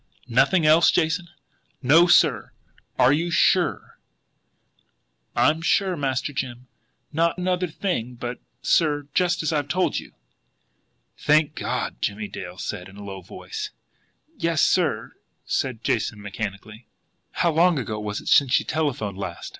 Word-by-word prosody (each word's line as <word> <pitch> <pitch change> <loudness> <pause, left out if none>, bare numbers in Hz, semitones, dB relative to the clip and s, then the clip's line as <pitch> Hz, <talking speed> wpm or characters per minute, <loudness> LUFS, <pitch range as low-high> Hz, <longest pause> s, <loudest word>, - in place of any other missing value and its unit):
"Nothing 140 +7 +4
else, 155 +2 +6
Jason?" 165 +2 +1 0.6
"No, 160 +7 +6
sir." 150 - +3 0.4
"You 145 +7 +3
are - - -4
SURE?" - - +1 1.4
"I'm 150 +7 +3
sure, 185 +2 +1
Master 140 -1 -2
Jim. 125 -1 -5 0.5
Not 165 +2 +1
another 180 0 0
thing 150 - -3
but 120 +1 -5
that, - - -26
sir, 145 -3 +2
just 180 -2 +1
as 155 - 0
I've 145 -2 0
told 180 +5 0
you." - - -13 1.1
"Thank 150 0 +3
God!" - - -3
said - - -38
Jimmie 105 +1 -2
Dale, 90 -1 -8
in 95 +3 -10
a 105 - -9
low 95 -1 -7
voice. 425 - -7 0.7
"Yes, 165 - +1
sir," 160 -12 +1 0.3
said 125 -4 -2
Jason 105 -1 -1
mechanically. 105 +2 -7 0.5
"How 170 - +1
long 170 +1 +3
ago 110 -4 -3
was 105 -1 -4
it - - -14
since 135 -3 +4
she - - +4
telephoned 125 -11 -2
last?" 90 -3 -6
145 Hz, 140 wpm, -24 LUFS, 110-165 Hz, 1.4 s, else